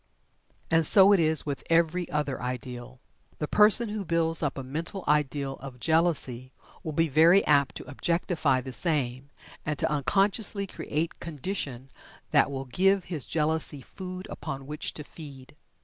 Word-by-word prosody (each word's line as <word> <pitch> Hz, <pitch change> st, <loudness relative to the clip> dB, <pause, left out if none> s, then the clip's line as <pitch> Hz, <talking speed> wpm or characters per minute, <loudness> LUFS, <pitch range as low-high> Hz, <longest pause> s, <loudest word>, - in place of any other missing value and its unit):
And 165 Hz, 0 st, +4 dB
so 195 Hz, +5 st, +7 dB
it 195 Hz, -, +4 dB
is 160 Hz, -2 st, +2 dB
with 140 Hz, -2 st, -4 dB
every 170 Hz, +1 st, +1 dB
other 150 Hz, -3 st, -2 dB
ideal. 125 Hz, 0 st, -6 dB, 0.4 s
The 150 Hz, -, -3 dB
person 210 Hz, +4 st, +4 dB
who 210 Hz, -1 st, -4 dB
builds 165 Hz, -2 st, +1 dB
up 145 Hz, -3 st, -2 dB
a 135 Hz, -, -5 dB
mental 165 Hz, +8 st, -5 dB
ideal 145 Hz, -2 st, 0 dB
of 130 Hz, -2 st, -10 dB
Jealousy 150 Hz, -6 st, 0 dB, 0.3 s
will 160 Hz, -, -5 dB
be 165 Hz, +2 st, +2 dB
very 165 Hz, +6 st, +5 dB
apt 140 Hz, -2 st, +2 dB
to -, -, -8 dB
objectify 150 Hz, -1 st, 0 dB
the 130 Hz, 0 st, -8 dB
same, 135 Hz, -3 st, -1 dB, 0.3 s
and 150 Hz, -1 st, -3 dB
to -, -, +2 dB
unconsciously 200 Hz, -, +1 dB
create 165 Hz, -3 st, -4 dB
condition 145 Hz, -5 st, -5 dB, 0.4 s
that -, -, +4 dB
will 135 Hz, -1 st, -5 dB
give 190 Hz, +8 st, +2 dB
his 165 Hz, -7 st, -1 dB
Jealousy 155 Hz, -2 st, -1 dB
food 185 Hz, 0 st, -8 dB
upon 135 Hz, 0 st, -6 dB
which 150 Hz, +2 st, -5 dB
to 150 Hz, -, -6 dB
feed. 145 Hz, -2 st, -12 dB
150 Hz, 155 wpm, -27 LUFS, 135-170 Hz, 0.4 s, so